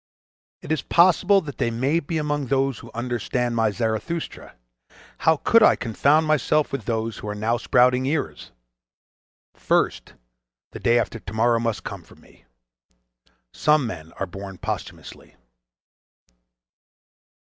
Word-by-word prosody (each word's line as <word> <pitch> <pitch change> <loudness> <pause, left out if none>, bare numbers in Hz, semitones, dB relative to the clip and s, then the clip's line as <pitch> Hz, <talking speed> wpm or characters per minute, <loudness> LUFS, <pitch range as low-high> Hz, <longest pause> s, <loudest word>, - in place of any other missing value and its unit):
It - - -6
is 155 - +1
possible 185 +3 +4
that 145 -5 -9
they - - +1
may 130 +8 0
be 165 +1 -4
among 145 -2 -2
those 135 -2 0
who - - -12
understand 120 0 -2
my 115 -1 +2
"Zarathustra": 115 +10 -4 0.6
how 160 -1 +3
could 230 +9 +4
I 215 - +6
confound 140 +7 +2
myself 155 0 +1
with 135 -7 -4
those 115 -1 -2
who - - -8
are 105 - -3
now 110 +3 0
sprouting 125 +2 +3
ears?—First - - -4 0.6
the - - -8
day 120 +1 +3
after 115 -1 -2
tomorrow 115 +4 +1
must 115 -1 -2
come 100 -3 -7
for - - -19
me. - - -22 1.1
Some 150 -3 +2
men 80 -7 -7
are 95 - -4
born 95 +1 -9
posthumously. - - -7
120 Hz, 130 wpm, -23 LUFS, 110-150 Hz, 1.1 s, I